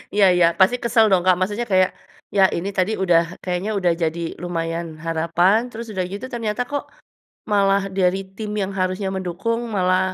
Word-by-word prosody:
Iya 205 -1 +5
iya 175 - +5
pasti 190 +6 +5
kesel 230 -1 +4
dong 185 - +4
Kak 185 -1 +5
maksudnya 205 +5 -1
kayak, 185 0 +4 0.5
ya 195 - +5
ini 180 +4 -3
tadi 185 +3 +2
udah 175 -3 +5 0.2
kayaknya 180 +3 -2
udah 180 -2 +2
jadi 165 +1 -1 0.2
lumayan 165 -1 -3 0.2
harapan 165 +4 +2
terus 230 0 -7
udah 185 -2 -1
gitu 205 +5 -5
ternyata 230 -1 -2
kok, 285 0 -2 0.7
malah 200 -1 +3 0.2
dari 185 0 +2 0.2
tim 215 -2 -5
yang 195 - -2
harusnya 185 +1 -1
mendukung 190 +6 -2 0.2
malah, 185 -1 +2
185 Hz, 170 wpm, -21 LUFS, 175-210 Hz, 0.7 s, Iya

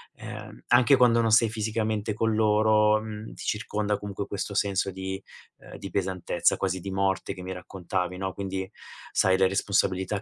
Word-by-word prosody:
ehm, - - -9
anche 125 +3 +6
quando 120 -2 +4
non 115 - +2
sei 115 -1 +5
fisicamente 110 -1 -2
con 110 +1 0
loro, 110 0 +4
mhmm, 110 0 -7
ti - - -10
circonda 105 -1 -1
comunque 100 0 -5
questo 100 0 -4
senso 100 -1 +1
di 95 +1 -5 0.4
uhm, - - -12
di 100 - -7
pesantezza, 95 -3 0
quasi 95 -1 -1
di 95 +2 -6
morte 95 0 0
che 95 - -10
mi 95 - -5
raccontavi, 90 0 -4
no, 95 0 -3
quindi, 95 -1 -4 0.4
sai, 95 0 +3
le 95 - +4
responsabilità 95 0 0
100 Hz, 170 wpm, -27 LUFS, 95-110 Hz, 0.4 s, anche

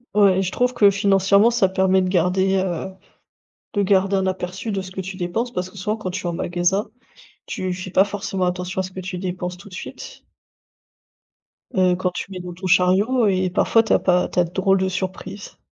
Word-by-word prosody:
Ouais, 195 -2 +4
je 185 - -2
trouve 250 +3 +1
que 205 -1 +6
financièrement 200 +1 +4
ça 235 -5 +2
permet 190 0 +2
de - - -1
garder, 190 +2 +2
heu, 185 0 -2 0.8
de 205 - +1
garder 195 0 +2
un 190 0 0
aperçu 185 +3 -4
de 195 -2 -2
ce 185 0 -10
que 190 - -5
tu 190 0 -6
dépenses 210 +7 -2
parce 180 -3 -3
que 185 - -16
souvent 210 +3 -2
quand 215 -4 -5
tu 185 - -4
es - - 0
en - - -2
magasin, 175 +4 0 0.6
tu 185 -1 -3
fais 185 +1 -6
pas 185 +1 +4
forcément 200 -2 -3
attention 180 +1 -3
à - - -3
ce 185 - -7
que 185 - -8
tu 185 0 -5
dépenses 180 -1 -4
tout 200 +3 -13
de - - -16
suite. - - -9 1.5
Heu, 185 -1 +3
quand 180 0 -1
tu 180 - -6
mets 185 - -6
dans 180 0 -7
ton 185 +2 -6
chariot 195 +7 +3
et 185 -1 +1
parfois, 225 +5 +3
tu 220 - +1
as - - +4
pas 180 -1 +2
tu - - -11
as - - +5
de 170 - -7
drôles 195 +1 +2
de 190 - +1
surprises. 190 +2 -6
190 Hz, 220 wpm, -21 LUFS, 180-200 Hz, 1.5 s, que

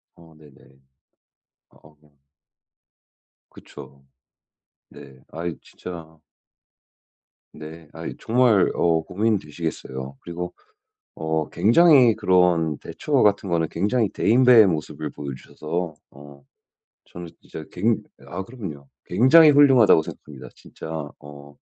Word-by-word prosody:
아 80 -1 -19
네네. 65 -3 -21 0.9
어. 75 0 -22 1.6
그쵸. 70 +1 -15 0.8
네. 70 -2 -15
아이 85 +1 -6
진짜 80 -3 -11 1.3
네. 80 0 -12
아이 - - -7
정말 115 -4 +2
어 85 -1 +1
고민되시겠어요. 80 -9 -4
그리고 90 +1 -7 0.6
어 80 -1 -3
굉장히 125 - +4
그런 90 -5 +1
대처 150 - -10
같은 100 -2 +1
거는 80 -2 0
굉장히 105 +5 0
대인배의 120 -3 +5
모습을 80 -4 -4
보여 70 -2 -7
주셔서 80 +4 -6 0.2
어 70 0 -15 0.6
저는 85 0 -10
진짜 80 - -10
굉 110 +4 0 0.2
아 95 +2 -6
그럼요. 95 - -9 0.2
굉장히 130 - +6
훌륭하다고 135 - +5
생각합니다. 65 -5 -11
진짜 - - -12 0.3
어 70 0 -14
85 Hz, 220 characters per minute, -22 LUFS, 75-105 Hz, 1.6 s, 굉장히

